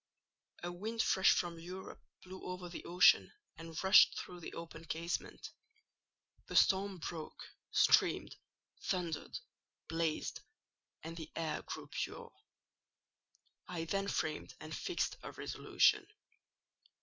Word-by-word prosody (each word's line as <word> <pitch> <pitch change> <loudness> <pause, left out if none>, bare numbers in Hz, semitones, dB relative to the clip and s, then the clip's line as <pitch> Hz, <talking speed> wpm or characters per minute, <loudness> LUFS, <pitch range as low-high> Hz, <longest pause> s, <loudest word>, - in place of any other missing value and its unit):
"A 175 - -2
wind 220 +6 -2
fresh 190 - +5
from 170 -1 0
Europe 180 +3 -8 0.2
blew 185 0 -10
over 180 0 -5
the 175 - -7
ocean 175 +2 +6 0.2
and 165 +1 -6
rushed 190 - +7
through 180 - -6
the 170 - -8
open 165 0 -8
casement: 165 +2 -4 1.0
the - - -6
storm 195 0 +4
broke, 160 -1 -6 0.3
streamed, - - +4 0.5
thundered, 175 -4 -2 0.5
blazed, 165 -1 -1 0.6
and 165 +1 -6
the 160 -2 -7
air 165 -1 -2
grew - - -6
pure. - - -5 1.3
I 170 -2 -3
then 195 +4 -1
framed 155 -5 -2
and 155 0 -6
fixed 360 - -1
a - - -8
resolution. - - +2
175 Hz, 115 wpm, -35 LUFS, 165-190 Hz, 1.3 s, rushed